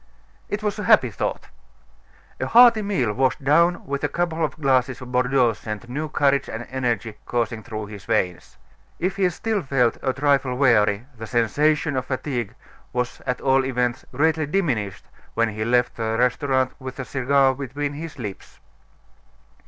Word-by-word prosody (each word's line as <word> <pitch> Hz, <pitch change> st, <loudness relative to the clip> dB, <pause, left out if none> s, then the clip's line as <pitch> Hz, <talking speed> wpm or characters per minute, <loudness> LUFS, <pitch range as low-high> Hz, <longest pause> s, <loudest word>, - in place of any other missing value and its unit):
It 210 Hz, +1 st, -3 dB
was 210 Hz, 0 st, -1 dB
a 210 Hz, -, -3 dB
happy -, -, +5 dB
thought. -, -, -4 dB, 0.9 s
A -, -, -1 dB
hearty 235 Hz, -2 st, +7 dB
meal 185 Hz, -, 0 dB
washed 130 Hz, +4 st, 0 dB
down 170 Hz, +5 st, +3 dB
with 140 Hz, 0 st, -3 dB
a -, -, +1 dB
couple 170 Hz, -2 st, -1 dB
of 155 Hz, 0 st, -2 dB
glasses 130 Hz, -3 st, +1 dB
of 125 Hz, -1 st, -9 dB
Bordeaux 125 Hz, -1 st, +3 dB
sent 105 Hz, +1 st, -7 dB
new 150 Hz, +5 st, -4 dB
courage 140 Hz, -1 st, +1 dB
and 115 Hz, +2 st, -5 dB
energy 120 Hz, -4 st, -2 dB
coursing 115 Hz, -2 st, -1 dB
through 110 Hz, -2 st, -6 dB
his 100 Hz, -1 st, -10 dB
veins. 95 Hz, -6 st, -1 dB, 0.4 s
If 185 Hz, +2 st, -2 dB
he 190 Hz, -2 st, +3 dB
still 210 Hz, +4 st, -2 dB
felt 130 Hz, -5 st, +1 dB
a 130 Hz, -, +1 dB
trifle 135 Hz, -2 st, +1 dB
weary, 110 Hz, -5 st, +3 dB
the 110 Hz, -1 st, -8 dB
sensation 145 Hz, +6 st, +1 dB
of 130 Hz, -1 st, -1 dB
fatigue 125 Hz, -4 st, -3 dB, 0.4 s
was 125 Hz, 0 st, -2 dB
at 125 Hz, 0 st, -1 dB
all 135 Hz, 0 st, +3 dB
events 125 Hz, -1 st, -1 dB
greatly 155 Hz, +3 st, +1 dB
diminished 135 Hz, -, -1 dB, 0.3 s
when 115 Hz, 0 st, +2 dB
he 110 Hz, 0 st, -4 dB
left 125 Hz, +1 st, +1 dB
the 110 Hz, -1 st, -1 dB
restaurant 130 Hz, +1 st, +1 dB
with 130 Hz, -1 st, -7 dB
a 130 Hz, -, -3 dB
cigar 135 Hz, +1 st, +2 dB
between 140 Hz, +2 st, -4 dB
his 160 Hz, +2 st, -7 dB
lips. 105 Hz, -6 st, -8 dB
130 Hz, 165 wpm, -23 LUFS, 120-145 Hz, 0.9 s, hearty